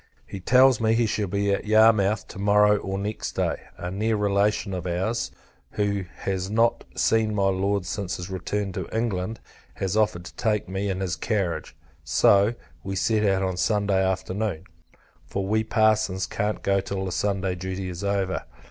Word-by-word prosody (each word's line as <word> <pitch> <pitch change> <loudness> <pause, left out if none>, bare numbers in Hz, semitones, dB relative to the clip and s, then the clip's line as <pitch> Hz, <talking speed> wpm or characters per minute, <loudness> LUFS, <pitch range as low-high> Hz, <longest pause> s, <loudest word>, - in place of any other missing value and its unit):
He 100 - -7
tells 125 +4 +5
me, 110 0 +3
he 115 0 +3
shall 105 -1 -1
be 100 +2 0
at 100 - -1
Yarmouth 110 -2 +4
to - - -9
morrow 105 +1 +4
or 95 -1 -4
next 105 +2 -4
day. - - 0 0.2
A 90 - -5
near 110 +4 0
relation 100 0 +1
of 90 -1 -4
our's, 95 +7 -1 0.4
who 100 -2 -1 0.2
has 95 -1 -2
not 115 +2 +2
seen 110 -1 +2
my 100 -1 +2
Lord 95 0 0
since 90 -1 -3
his 90 - -6
return 100 +1 -3
to - - -5
England, 110 -2 -2 0.4
has 95 +1 -2
offered 105 -5 +1
to - - -11
take 105 -3 0
me 95 +2 -2
in 95 0 -2
his 90 -2 -1
carriage: 90 -3 -2 0.3
so, 100 +9 +4 0.3
we 95 0 -4
set 110 +3 +1
out 95 -2 +2
on 95 -1 -1
Sunday 100 -1 +2
afternoon; 95 -1 -2 0.6
for 100 -1 -3
we 110 +2 +1
parsons 110 -4 +2
can't 105 +4 -2
go 100 0 +2
till 95 0 -4
the 95 - -3
Sunday 95 0 0
duty 95 +1 -4
is 90 +1 -6
over. 100 -2 -1
100 Hz, 175 wpm, -25 LUFS, 95-105 Hz, 0.6 s, tells